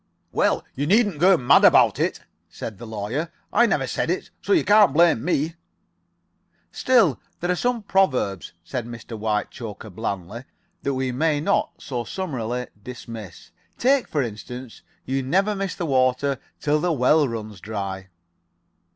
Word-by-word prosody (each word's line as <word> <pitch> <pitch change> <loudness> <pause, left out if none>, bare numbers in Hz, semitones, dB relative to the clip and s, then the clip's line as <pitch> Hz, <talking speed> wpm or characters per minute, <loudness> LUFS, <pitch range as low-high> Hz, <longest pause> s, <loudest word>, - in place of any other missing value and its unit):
"Well, - - +1
you 145 +2 -2
needn't 205 -4 +3
get 185 +1 +5
mad 125 - +5
about - - +6
it," - - -1 0.3
said 110 -4 -7
the 120 - -8
Lawyer. 110 +10 -3 0.2
"I 235 +3 +5
never - - +1
said - - -2
it - - -2
so - - -4
you 370 - +4
can't 205 -7 +6
blame 165 -7 +4
me." 160 -1 0 1.2
"Still, 225 - +3 0.2
there 175 +1 0
are - - +1
some 245 +3 -1
proverbs," 130 - +1
said 120 +7 -4
Mr. 115 -1 -8
Whitechoker, 110 0 -4
blandly, 100 +3 -5 0.4
"that 140 -1 -1
we 130 -1 -1
may 150 +3 +1
not 150 - +1
so 125 -3 -4
summarily 125 - -3 0.2
dismiss. 115 -5 -9 0.3
Take, 265 +1 +3
for 145 -3 0
instance, 120 +2 -8 0.2
'You 135 +1 -1
never 190 +11 +1
miss 195 -2 -3
the 175 - -3
water 130 -1 +1 0.2
till 150 +1 +1
the 175 +3 0
well 150 +1 +3
runs 110 -4 -6
dry.'" 100 -3 -5
130 Hz, 150 wpm, -23 LUFS, 115-170 Hz, 1.2 s, about